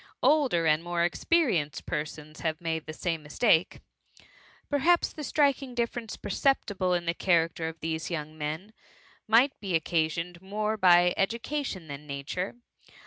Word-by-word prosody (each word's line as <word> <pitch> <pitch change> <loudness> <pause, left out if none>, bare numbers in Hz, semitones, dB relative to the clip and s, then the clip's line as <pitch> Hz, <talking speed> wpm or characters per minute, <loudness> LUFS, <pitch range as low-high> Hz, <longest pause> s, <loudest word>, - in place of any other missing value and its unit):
Older 270 - +3
and 155 +1 +3
more 175 0 0
experienced 175 - +1
persons 155 0 -5
have 160 -1 -2
made 160 -2 -3
the - - -4
same 165 0 -2
mistake. 160 +3 +2 0.9
Perhaps 325 +5 +2
the 305 - -7
striking 280 -4 +1
diflference 235 -2 -3
perceptible 200 -6 +1
in 175 -1 -2
the 170 - +1
character 165 -2 +1
of 165 0 -11
these 160 0 -3
young 155 -2 -4
men, 155 +7 -5 0.5
might 240 +6 +4
be 190 -4 -2
oc 160 - +1
casioned 170 +1 -1
more 210 +3 -2
by 180 -3 +5
education 230 - -2
than 145 +1 -8
nature. 145 +9 -4
175 Hz, 140 wpm, -28 LUFS, 160-225 Hz, 0.9 s, by